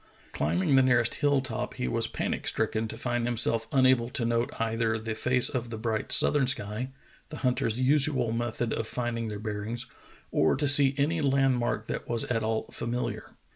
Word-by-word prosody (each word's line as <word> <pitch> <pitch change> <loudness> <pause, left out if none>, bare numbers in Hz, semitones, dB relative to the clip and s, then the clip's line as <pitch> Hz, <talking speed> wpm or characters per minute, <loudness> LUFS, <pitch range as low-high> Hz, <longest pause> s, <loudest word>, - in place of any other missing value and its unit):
Climbing 85 - 0
the 135 - +6
nearest 125 -3 +2
hill 145 -2 +1
top, 125 -4 -4
he - - -3
was 60 - 0
panic - - -4
stricken 110 0 0
to - - -7
find 120 -1 -2
himself 115 -1 +1
unable 130 -3 +3
to 125 -2 -2
note 115 0 0
either 115 0 -1
the 110 0 -5
face 125 +3 +3
of 120 -2 -4
the 115 - -6
bright 110 -1 -3
southern 140 -3 +5
sky, 115 0 -3 0.4
the 155 - -8
hunters' 125 -2 0
usual 130 -3 +2
method 120 0 -2
of 115 - -3
finding 120 -1 -3
their 105 -1 -5
bearings, 110 +3 -5 0.5
or 80 - +2
to 145 +2 -1
see 140 -1 +7
any 155 +3 0
land 135 -2 +2
mark 115 -2 -2
that - - -6
was 120 -1 +1
at 115 -2 -2
all 110 0 -2
famiHar. 120 +1 -5
120 Hz, 185 wpm, -27 LUFS, 110-130 Hz, 0.5 s, see